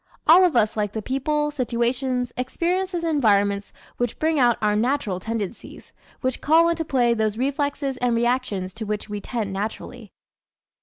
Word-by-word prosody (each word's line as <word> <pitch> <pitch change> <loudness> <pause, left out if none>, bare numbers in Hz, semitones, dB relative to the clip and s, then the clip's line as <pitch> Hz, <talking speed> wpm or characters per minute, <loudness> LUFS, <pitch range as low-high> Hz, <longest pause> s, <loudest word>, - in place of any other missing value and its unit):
All 345 +4 +7
of 355 -6 +2
us 220 -2 +2
like 210 -2 -1
the 220 - -3
people, 295 +4 -1
situations, 250 -1 -1
experiences 350 +7 -1
and 330 -1 0
environments 200 -5 +2 0.3
which 245 -2 -2
bring 315 -1 +1
out 240 -2 +4
our 210 -1 +1
natural 225 -5 0
tendencies, 225 +1 -6 0.3
which 255 -1 -2
call 330 +3 +4
into 335 -1 -1
play 245 -5 +2
those 220 -2 -1
reflexes 280 +1 -1
and 245 -1 +1
reactions 230 -6 -1
to 220 +1 -6
which 210 0 -3
we 205 0 -4
tend 215 -3 -3
naturally. 215 +2 -6
245 Hz, 160 wpm, -23 LUFS, 215-285 Hz, 0.3 s, All